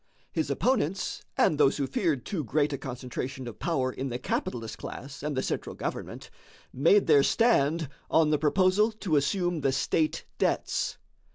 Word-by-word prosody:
His - - -1
opponents 200 - 0 0.2
and 150 - +3
those 140 -2 +4
who 140 - 0
feared 160 - -1
too 175 -7 -2
great 145 +4 +1
a - - -2
concentration 130 0 -5
of 115 - -8
power 135 -7 0
in 130 +1 -4
the 120 - -3
capitalist 115 -2 -3
class 135 +2 -8
and 145 -1 -3
the 130 - +1
central - - -3
government - - -5 0.4
made 165 +10 +4
their 150 -4 +6
stand 165 - +2 0.2
on 160 -1 +4
the 150 - +2
proposal 185 +8 +3
to 195 -7 -1
assume 175 +3 +1
the 135 - +2
state 155 +3 0
debts. - - 0
150 Hz, 165 wpm, -28 LUFS, 135-175 Hz, 0.4 s, their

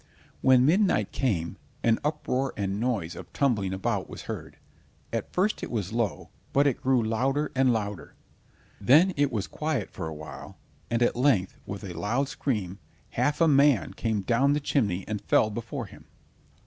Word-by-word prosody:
When 130 -1 +5
midnight 165 - +3
came, 90 -11 -1 0.3
an 115 -1 +3
uproar 135 -3 -1
and 100 0 -2
noise 105 -9 -1
of 90 -1 -10
tumbling 110 -9 +1
about 95 0 -2
was - - -8
heard; - - -7 0.6
at - - -3
first 200 +4 0
it - - -4
was 105 -3 -3
low, 115 -5 -2 0.2
but 140 +1 +4
it 140 -4 +1
grew 130 -3 +2
louder 130 +7 0
and 130 -1 +3
louder. 105 -5 -3 0.6
Then 155 - +5
it 145 -2 +2
was 105 -4 -1
quiet 150 -9 -3
for 85 - -5
a 80 - -6
while, 75 +1 -9 0.3
and 120 +1 +2
at - - +2
length 120 -8 +2
with 100 +1 -6
a 95 -3 -6
loud 125 +10 -1
scream, 100 -10 -2 0.3
half 145 +2 0
a 165 - +6
man 140 -4 +4
came 110 -3 -1
down 125 +7 +2
the 150 - +1
chimney 105 -11 0
and 105 -2 -3
fell 105 +1 +3
before 120 +4 -5
him. 95 - -15
120 Hz, 175 wpm, -27 LUFS, 100-140 Hz, 0.6 s, a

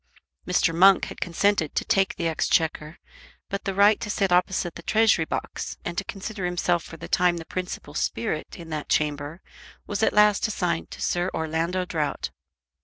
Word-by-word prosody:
Mr. 180 -2 +2
Monk 190 +3 +6
had - - -10
consented 175 -2 +1
to - - 0
take 195 -1 +2
the 170 - -1
Exchequer, 160 -1 0 0.5
but 200 0 -4
the 195 - -1
right 205 +2 +5
to 210 - -5
sit 195 -2 0
opposite 180 0 +2
to - - -9
the - - -33
Treasury 220 -7 +4
Box - - -4
and 175 - -3
to 200 - -1
consider 200 0 -6
himself 175 -1 +1
for 165 - -10
the - - -8
time 175 -1 +2
the 165 - -7
principal 180 -5 -5
spirit 150 +3 -2
in 165 -2 -10
that 155 -1 -4
chamber 150 +2 -1 0.4
was 205 0 -3
at - - +3
last 210 +1 +4
assigned 85 - -2
to - - -7
Sir 175 +1 0
Orlando 165 +3 -1
Drought. 155 -5 -2
175 Hz, 180 wpm, -25 LUFS, 160-195 Hz, 0.5 s, Monk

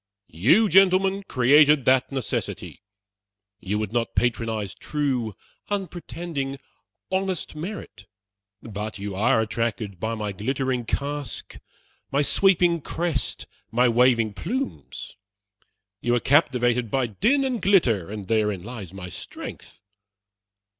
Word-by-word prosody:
You, 140 - +4
gentlemen, 190 +1 +4
created 145 +2 +5
that 130 +1 +3
necessity! 130 -5 -4 0.8
You 100 +2 -2
would 105 0 -3
not 120 -1 -1
patronize 115 -5 0
true, 130 -8 -2 0.3
unpretending, 170 -7 -4 0.5
honest 190 -4 -1
merit, 160 - -7 0.6
but 110 -1 -5
you 100 0 -5
are 105 +3 +3
attracted 110 -3 -2
by 110 +4 -2
my 105 -2 -3
glittering 130 +4 -2
casque, 145 +3 -4 0.5
my 140 +2 +2
sweeping 175 0 +3
crest, 165 -1 -2 0.2
my 120 +3 +3
waving 115 -2 +3
plumes. 245 - -5 0.9
You 120 0 +2
are - - +2
captivated 125 -4 +2
by 130 +3 +1
din 225 - +2
and 255 -5 -1
glitter, 125 - +3
and 105 -1 -6
therein 105 -3 0
lies 105 -5 -8
my 90 -2 -7
strength. - - -9
125 Hz, 115 wpm, -24 LUFS, 110-165 Hz, 0.9 s, created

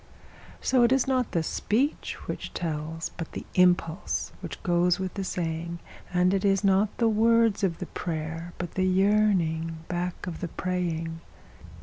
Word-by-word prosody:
So 255 -2 +3
it 240 0 +5
is 265 -1 +4
not 255 -2 +1
the 165 - +1
speech 250 - -1
which - - -5
tells, 165 0 -3
but 165 - -6
the - - -6
impulse 180 -1 +2
which - - -7
goes 175 0 +3
with 190 -1 -3
the 195 - -3
saying; 170 -1 -3 0.3
And 180 +1 +3
it 195 - +1
is 195 0 +3
not 195 +1 +3
the 230 - +3
words 225 -1 +3
of 170 -4 +1
the 180 - -5
prayer, 165 0 -4
but 175 -1 -4
the 185 0 +1
yearning 185 -5 +2
back 180 0 -3
of 175 -3 -5
the 175 - -3
praying. 165 -2 -2
180 Hz, 160 wpm, -27 LUFS, 165-200 Hz, 0.3 s, it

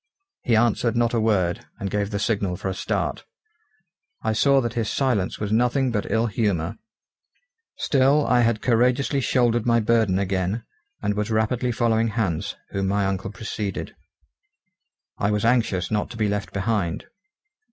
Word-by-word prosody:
He 120 - +2
answered 115 +1 +2
not 120 0 +2
a 115 - +2
word, 95 -6 0
and 100 -1 -3
gave 105 -1 -1
the 100 - -2
signal 100 -4 0
for 95 - -3
a - - -2
start. - - -2 1.0
I 110 - +1
saw 140 +5 +4
that 120 -3 -2
his 115 -3 -1
silence 120 -9 0
was 105 -1 -3
nothing 125 +3 +2
but 105 -3 -2
ill 115 +1 +2
humour. 100 - -1 1.0
Still 140 +2 +3
I 125 - +3
had 115 -2 +1
courageously 125 +4 +2
shouldered 120 -2 +1
my 115 0 +4
burden 110 -4 +2
again, 95 +3 -1 0.4
and 105 - +1
was 105 +1 -2
rapidly 115 +3 0
following 115 -1 +1
Hans, 100 -4 -2 0.2
whom 95 -1 -1
my 100 +1 +1
uncle 95 0 -2
preceded. 105 -2 -5 1.2
I 100 - +1
was 105 +1 0
anxious 115 -7 +1
not 105 -1 0
to 115 - -9
be 110 -1 +1
left 105 0 -2
behind. 100 -4 -1
110 Hz, 160 wpm, -24 LUFS, 100-120 Hz, 1.2 s, saw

